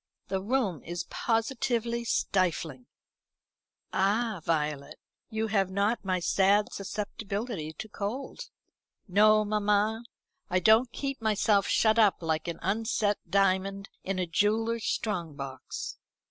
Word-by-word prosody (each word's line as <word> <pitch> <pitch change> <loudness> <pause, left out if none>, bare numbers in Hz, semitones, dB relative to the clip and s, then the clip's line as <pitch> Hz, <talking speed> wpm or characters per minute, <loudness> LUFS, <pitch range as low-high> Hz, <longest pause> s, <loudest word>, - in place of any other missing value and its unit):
The 190 -1 -1
room 210 - 0
is 175 +1 -4
positively 235 0 0
stifling." 165 - 0 1.1
"Ah 205 0 +1
Violet, 150 -3 -1 0.3
you 220 -1 -1
have 195 -3 +2
not 200 +4 0
my 185 -2 0
sad 200 +4 +3
susceptibility 200 -3 -4
to 190 - -7
cold." 215 +6 -5 0.6
"No, 215 +2 +5
mamma. 210 +2 +1 0.5
I 185 - +2
don't 220 +6 +5
keep 275 -3 -4
myself 210 -2 +2
shut 220 0 +3
up 205 -5 +4
like 160 0 -1
an 170 -1 -3
unset 210 +1 0
diamond 195 0 +1
in 195 0 -2
a 185 - 0
jeweller's 220 +6 +1
strong 175 -8 -2
box." 135 -2 -6
205 Hz, 120 wpm, -29 LUFS, 185-220 Hz, 1.1 s, No